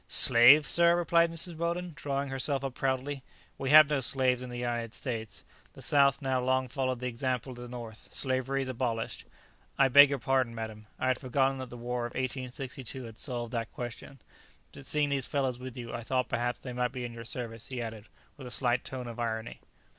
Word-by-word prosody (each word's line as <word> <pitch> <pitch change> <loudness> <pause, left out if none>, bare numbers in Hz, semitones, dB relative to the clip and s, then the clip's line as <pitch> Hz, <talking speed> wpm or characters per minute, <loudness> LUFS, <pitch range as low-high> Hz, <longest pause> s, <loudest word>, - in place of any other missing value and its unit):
"Slaves! 130 +5 +7
sir," 170 +4 +5
replied 170 -1 +3
Mrs. 165 +1 -3
Weldon, 170 +1 -2
drawing 140 -1 -3
herself 135 +1 -1
up 135 -2 -3
proudly; 135 +2 -2 0.4
"we 135 - -2
have 155 0 +9
no 145 -1 0
slaves 130 -1 +2
in 125 - -6
the 120 - -6
United 120 -2 -3
States. 115 -4 -5 0.3
The - - -13
south 140 -3 +4
has - - -20
now 130 -1 +1
long 130 0 +1
followed 130 -1 -2
the 125 - -5
example 125 +1 -2
of 125 - -10
the 120 - -7
north. 120 -3 -9
Slavery 135 +1 -1
is - - -5
abolished." 115 -3 -3 0.5
"I 135 -1 +5
beg 145 +2 +9
your 140 - -1
pardon, 130 -1 0
madam. 110 -1 -7
I 130 - 0
had 130 - +1
forgotten 135 0 0
that 130 -1 -6
the 120 - -9
war 120 0 -3
of - - -14
1862 130 0 -5
had 115 -2 -10
solved 120 -3 -3
that 115 -1 -3
question. 125 +3 -8 0.5
But 140 -1 -10
seeing 150 -1 +1
these 135 -3 +1
fellows 130 -3 -1
with 130 -1 -8
you, 120 -1 -7
I 120 - -4
thought 125 +2 -1
perhaps 120 0 -1
they 125 - -7
might 125 +1 -1
be 125 -2 -4
in 120 - -6
your 115 0 -8
service," 115 -1 -5
he 130 -2 -5
added, 110 -2 -6 0.3
with 135 -3 -9
a - - -7
slight 120 0 +1
tone 130 -2 -5
of 120 0 -8
irony. 110 -1 -3
130 Hz, 215 wpm, -30 LUFS, 120-135 Hz, 0.5 s, have